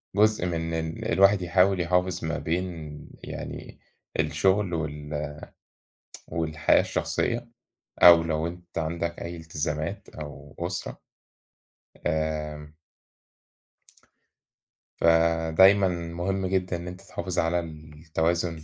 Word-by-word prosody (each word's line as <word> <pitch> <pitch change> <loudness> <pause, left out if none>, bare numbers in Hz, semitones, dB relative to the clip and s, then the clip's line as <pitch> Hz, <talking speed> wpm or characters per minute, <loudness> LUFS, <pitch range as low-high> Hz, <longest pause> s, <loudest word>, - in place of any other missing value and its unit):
جزء 105 -3 +3
من 85 -1 -2
إن 80 +7 -3
الواحد 100 0 +5
يحاول 90 +1 +3
يحافظ 90 0 0
ما 85 +1 -1
بين 80 -3 -3 0.2
يعني - - -7 0.4
الشغل 95 -1 +2
وال 75 -2 -4 1.0
والحياة 80 -2 +2
الشخصية، 120 0 -1 0.5
أو 85 -1 +10
لو 80 0 -1
أنت 85 0 -7
عندك 85 +1 -2
أي 85 0 -5
التزامات 80 -1 -4
أو 75 -1 -9
أسرة. 90 +1 -4 1.1
آآ 75 -1 -2 2.2
فدايمًا 85 +4 +5
مهم 85 +3 -2
جدًا 90 -1 0
إن 85 +1 -8
أنت 90 0 -8
تحافظ 90 0 -3
على 85 +1 +2
التوازن 80 +1 -2
85 Hz, 95 wpm, -26 LUFS, 80-90 Hz, 2.2 s, أو